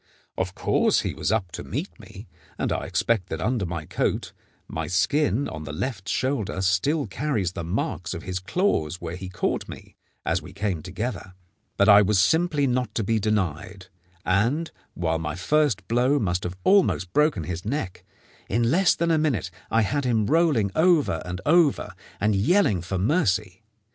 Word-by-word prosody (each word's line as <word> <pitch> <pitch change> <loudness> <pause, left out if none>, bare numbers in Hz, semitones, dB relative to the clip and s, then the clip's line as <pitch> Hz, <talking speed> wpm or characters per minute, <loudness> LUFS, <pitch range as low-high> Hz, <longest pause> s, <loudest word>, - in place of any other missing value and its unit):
Of 95 0 -3
course - - +2
he - - -3
was - - -2
up 100 -6 0
to - - -6
meet - - -5
me, - - -12 0.3
and - - -1
I - - -3
expect 110 -6 0
that - - -4
under 110 -5 -1
my 85 -2 -4
coat - - -2 0.3
my 80 -1 -4
skin 140 - +1
on 80 -1 -7
the 70 - -6
left 100 - -4
shoulder 130 -8 -1
still 105 - +1
carries 105 - -2
the 85 - -5
marks 90 - -3
of 85 - -7
his 95 0 -3
claws 95 - 0
where 85 0 -5
he 95 0 -7
caught 95 - -2
me - - -11 0.3
as - - 0
we - - -12
came 95 -7 -2
together. 95 +2 -5 0.4
But 100 - +4
I 105 -1 +9
was 105 0 +2
simply 155 - +3
not 125 -4 -1
to 110 - 0
be 110 +2 +1
denied, 95 -2 -2 0.4
and, 120 - +1 0.2
while 80 -2 -1
my 80 -1 -3
first 145 - +1
blow 125 +5 +2
must 90 -7 -1
have 90 +1 -5
almost 185 - +3
broken 150 - +2
his 90 +1 -5
neck, 110 -5 -4 0.5
in 115 +3 +1
less 180 +3 +4
than 170 0 0
a 160 - +3
minute 130 - 0 0.2
I 115 -1 +3
had 140 +7 -1
him 115 -4 +1
rolling 145 - +2
over 160 - +3
and 90 0 -5
over 160 -2 +3 0.3
and 105 0 +2
yelling 105 - +3
for 95 +3 -3
mercy. 100 - 0
105 Hz, 180 wpm, -25 LUFS, 90-140 Hz, 0.5 s, I